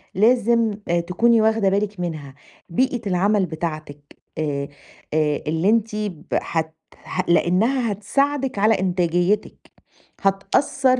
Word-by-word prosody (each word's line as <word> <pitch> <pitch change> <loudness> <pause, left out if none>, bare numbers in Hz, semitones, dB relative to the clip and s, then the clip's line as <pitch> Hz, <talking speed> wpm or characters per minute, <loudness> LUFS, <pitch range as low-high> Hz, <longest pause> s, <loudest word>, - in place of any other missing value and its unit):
لازم 230 +1 +3 0.2
آآ، 170 0 +2
تكوني 220 +7 +2
واخدة 220 -2 +2
بالِك 200 0 -1
منها، 155 -6 -5 0.3
بيئة 250 +7 0
العمل 195 +2 +2
بتاعتِك 155 -3 -5 0.4
آآ، 140 -2 -2 0.5
آآ، 150 -2 +1
اللي 160 +5 +1
أنتِ 225 -1 +1
ب 205 -6 -4 0.2
هت 160 -1 -3 0.3
هت 185 -1 -3
لأنها 220 +8 +2
هتساعدِك 270 +5 -1
على 215 +1 +3
إنتاجيتِك، 180 +1 0 0.5
هتأثّر 255 +6 +1
195 Hz, 115 wpm, -22 LUFS, 170-225 Hz, 0.5 s, لازم